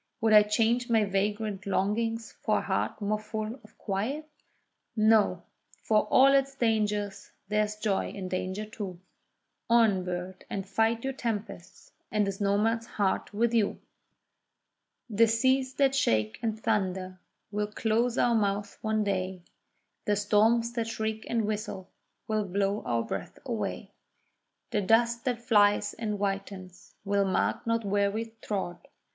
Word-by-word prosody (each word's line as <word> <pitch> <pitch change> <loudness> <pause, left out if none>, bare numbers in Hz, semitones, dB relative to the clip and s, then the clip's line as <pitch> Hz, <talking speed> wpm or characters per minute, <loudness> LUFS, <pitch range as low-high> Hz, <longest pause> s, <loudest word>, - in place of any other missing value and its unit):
Would 220 -1 +3
I 210 - +10
change 230 +3 +1
my 225 -2 +4
vagrant 200 0 -2
longings 225 +4 0
for - - +2
a - - 0
heart - - -1
more 210 +1 0
full 215 +3 -5
of 215 - -19
quiet? 230 +10 -3 0.7
No!—for 215 0 +1
all 270 +5 +6
its 275 0 +2
dangers, 210 -4 0 0.2
there 210 0 +2
is 210 0 -6
joy 210 -2 -1
in 190 -2 -6
danger 185 +3 -3
too: 205 -5 -7 0.7
On, 225 -5 +4
bird, 180 +1 -5
and 195 -1 -4
fight 225 +3 +1
your 270 0 -2
tempests, 220 -8 -5 0.2
and 210 -1 +2
this 195 +1 -4
nomad 210 +3 +2
heart 200 -4 -1
with 230 +3 +1
you! 220 -3 +1 1.3
The 225 0 +4
seas 260 +3 +2
that 275 -2 +3
shake 110 - +1
and 220 -2 -2
thunder 190 -4 -1 0.3
will 210 0 -1
close 230 +3 0
our 240 - +3
mouths 205 -2 -1
one 220 -1 +1
day, 185 -2 -2 0.6
The 210 - +2
storms 220 +3 +3
that 230 -2 -2
shriek 220 -1 -3
and 230 -2 +1
whistle 210 -3 -4 0.4
will 215 -2 0
blow 200 +2 0
our 115 -1 +1
breaths - - -5
away. - - -3 0.8
The 210 - +1
dust 235 +3 +2
that 245 -3 0
flies 205 -4 +3
and 215 -2 -3
whitens 195 -2 -5
will 200 0 +2
mark 190 +4 0
not 230 -1 0
where 200 0 +2
we 225 +2 -4
trod. 190 -4 -4
210 Hz, 145 wpm, -28 LUFS, 200-230 Hz, 1.3 s, I